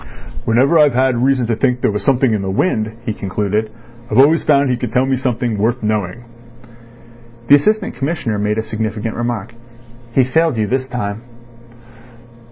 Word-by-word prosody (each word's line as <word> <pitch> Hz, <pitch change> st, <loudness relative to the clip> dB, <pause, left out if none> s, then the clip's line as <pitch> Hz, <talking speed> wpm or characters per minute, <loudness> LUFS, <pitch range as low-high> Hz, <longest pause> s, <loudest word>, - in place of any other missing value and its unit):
"Whenever 135 Hz, +8 st, +3 dB
I've 145 Hz, -4 st, +4 dB
had 130 Hz, 0 st, +2 dB
reason 130 Hz, -1 st, +2 dB
to 115 Hz, 0 st, 0 dB
think 125 Hz, +2 st, 0 dB
there -, -, +2 dB
was 105 Hz, -, -3 dB
something 130 Hz, -3 st, +2 dB
in 105 Hz, -, -1 dB
the 95 Hz, -, -3 dB
wind," 110 Hz, -, 0 dB
he 110 Hz, -, -1 dB
concluded, 105 Hz, +2 st, -2 dB, 0.4 s
"I've 105 Hz, -, -1 dB
always 150 Hz, +5 st, +5 dB
found 140 Hz, -3 st, +3 dB
he -, -, +1 dB
could 120 Hz, -2 st, -4 dB
tell 125 Hz, +1 st, +2 dB
me 135 Hz, 0 st, +1 dB
something 120 Hz, -4 st, -2 dB
worth 115 Hz, +3 st, 0 dB
knowing." 105 Hz, +1 st, -2 dB, 1.3 s
The 145 Hz, -, +9 dB
Assistant 215 Hz, +8 st, +1 dB
Commissioner 135 Hz, -7 st, -2 dB
made 105 Hz, +1 st, -1 dB
a 110 Hz, -, -1 dB
significant 110 Hz, 0 st, -4 dB
remark. 120 Hz, -2 st, -3 dB, 0.6 s
"He 130 Hz, -, +4 dB
failed 155 Hz, +2 st, +1 dB
you 110 Hz, -, +1 dB
this 130 Hz, +4 st, -2 dB
time." 110 Hz, -4 st, -4 dB
120 Hz, 175 wpm, -17 LUFS, 110-135 Hz, 1.3 s, The